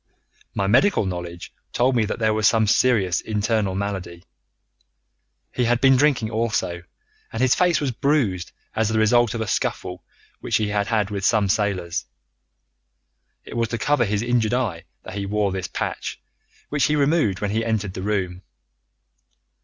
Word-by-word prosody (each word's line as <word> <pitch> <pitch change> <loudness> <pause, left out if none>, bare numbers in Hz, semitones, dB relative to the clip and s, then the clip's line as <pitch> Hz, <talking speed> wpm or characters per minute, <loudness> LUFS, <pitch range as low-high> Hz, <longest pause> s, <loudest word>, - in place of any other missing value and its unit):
My 100 - 0
medical 125 - +3
knowledge 90 -2 -6 0.2
told 125 +1 +2
me 115 -2 +2
that 105 - -3
there 110 -1 +1
was 110 0 +3
some 110 -1 +3
serious 105 -5 +2
internal 105 -2 -1
malady. 95 -4 -4 1.3
He 125 - 0
had 120 0 +2
been 135 +1 +5
drinking 130 -5 +2
also, 110 -6 -1 0.5
and 115 - -5
his 130 0 +4
face 180 -2 +2
was 140 -3 -1
bruised 120 - 0 0.2
as 110 -1 +1
the 110 - 0
result 115 +1 +3
of 115 - -3
a 110 - -2
scuffle 90 -1 -2 0.4
which - - 0
he 105 -1 -1
had 100 -1 0
had 105 -2 0
with 100 -1 -3
some 105 -1 +3
sailors. 95 - -1 1.4
It - - -10
was 115 -1 +1
to 115 - -3
cover 140 +2 +2
his 105 +1 -1
injured 120 -1 +1
eye 105 -10 -2 0.2
that - - -9
he 100 0 -4
wore 105 -1 0
this 95 -1 -3
patch, - - -4 0.5
which 150 -1 +1
he 150 - +1
removed 145 - +2
when 105 -1 -2
he 110 +2 0
entered 105 -4 -1
the 95 - -6
room. 95 -3 -2
110 Hz, 170 wpm, -23 LUFS, 100-120 Hz, 1.4 s, been